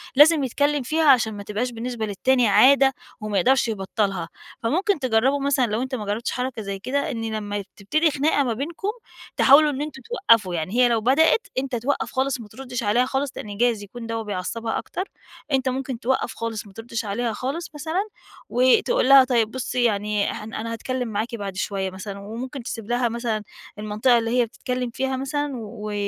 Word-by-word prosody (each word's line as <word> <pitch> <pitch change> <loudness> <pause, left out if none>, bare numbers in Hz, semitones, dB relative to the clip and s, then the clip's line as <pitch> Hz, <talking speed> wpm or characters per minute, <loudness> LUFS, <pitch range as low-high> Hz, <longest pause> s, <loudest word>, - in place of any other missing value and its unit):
لازم 295 0 +7
يتكلم 285 +2 +1
فيها، 315 +5 +1
عشان 225 -5 +5
ما 205 -1 -7
تبقاش 220 +5 -2
بالنسبة 235 -1 -4
للتاني 245 +4 +2
عادة 270 +5 +6 0.3
وما 210 -2 -2
يقدرش 260 +5 +3
يبطّلها. 195 -4 -2 0.3
فممكن 365 - +1
تجربوا 255 +3 +2
مثلًا 275 -2 +2
لو 215 +3 -1
أنت 260 0 -3
ما 210 -4 -5
جربتش 210 +3 -2
حركة 250 -3 -3
زي 200 -1 -5
كده 265 +6 -1
إن 225 -2 -3
لمّا 205 -1 -3
تبتدي 305 +11 +1
خناقة 285 0 +2
ما 240 -3 0
بينكم 325 - -4 0.5
تحاولوا 295 +3 +7
إن 275 +1 -4
أنتم 295 -3 -6
توقفوا، 230 - +2
يعني 165 +5 -3
هي 250 0 +5
لو 230 -2 +1
بدأت 315 - +3
أنت 265 -2 -3
توقّف 255 +5 -1
خالص 265 -1 0
وما 220 - -9
تردش 250 +1 -6
عليها 235 +5 +3
خالص، 270 +1 -1
لأن 205 -1 -7
جايز 235 -3 +1
يكون 230 +3 -9
دوّة 225 0 -3
بيعصبها 210 +3 -3
أكتر، 370 - -4 0.5
أنت 265 -1 +2
ممكن 255 -2 -3
توقّف 260 +1 0
خالص 225 -2 -4
وما 195 - -15
تردش 225 0 -5
عليها 225 +3 -1
خالص 285 +9 -4
مثلًا، 330 +8 -2 0.4
وتقُول 260 - +3
لها 275 -1 +9
طيب 235 -4 +1
بُصي 255 -1 -2
يعني 210 -2 +1
احن 215 +1 -8
أنا 230 +1 -4
هاتكلم 250 +1 -3
معاكِ 225 +3 -3
بعد 200 -3 -5
شوية 190 0 -2
مثلًا، 195 +1 -7
وممكن 240 +6 -6
تسيب 225 -2 -6
لها 240 0 +1
مثلًا 230 -2 -2 0.4
المنطقة 215 +4 +2
اللي 230 +2 0
هي - - +2
بتتكلم 250 +2 -4
فيها 265 +2 -2
مثلًا 290 +2 -2
و 215 -1 -6
240 Hz, 185 wpm, -23 LUFS, 215-270 Hz, 0.5 s, لها